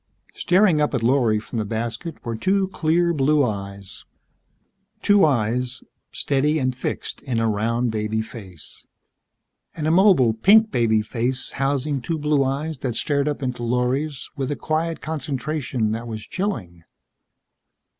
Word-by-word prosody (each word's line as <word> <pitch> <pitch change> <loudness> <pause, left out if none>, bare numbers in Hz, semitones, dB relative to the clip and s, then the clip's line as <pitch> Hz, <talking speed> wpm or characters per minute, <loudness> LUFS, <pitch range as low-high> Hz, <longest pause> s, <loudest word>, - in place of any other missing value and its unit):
Staring 180 -4 +3
up 150 -2 +1
at 120 - -1
Lorry 120 -3 +3
from 110 +2 -5
the - - 0
basket 115 - -4
were 115 -1 -2
two 190 - +1
clear 170 -1 +1
blue 145 0 +3
eyes. 100 -3 -6 1.0
Two 205 -1 +5
eyes, 125 -2 +1 0.3
steady 145 +2 +1
and 130 -3 0
fixed - - -4
in 125 -5 -2
a 115 - +1
round 115 +3 0
baby 110 0 -1
face. 95 - -11 0.9
An 150 - -4
immobile, 165 - +5
pink 215 - +5
baby 110 - +2
face 125 +3 -2
housing 135 0 -1
two 165 +6 -2
blue 150 -2 +2
eyes 140 +3 -2
that 125 -4 -3
stared 140 +3 0
up 145 -1 -2
into 125 -1 -3
Lorry's 125 +4 -1
with 135 -2 -3
a 145 - -1
quiet 160 +2 -2
concentration 140 -5 -2
that 115 +2 -4
was 110 -2 -6
chilling. 95 - -4
130 Hz, 145 wpm, -22 LUFS, 115-155 Hz, 1.0 s, Two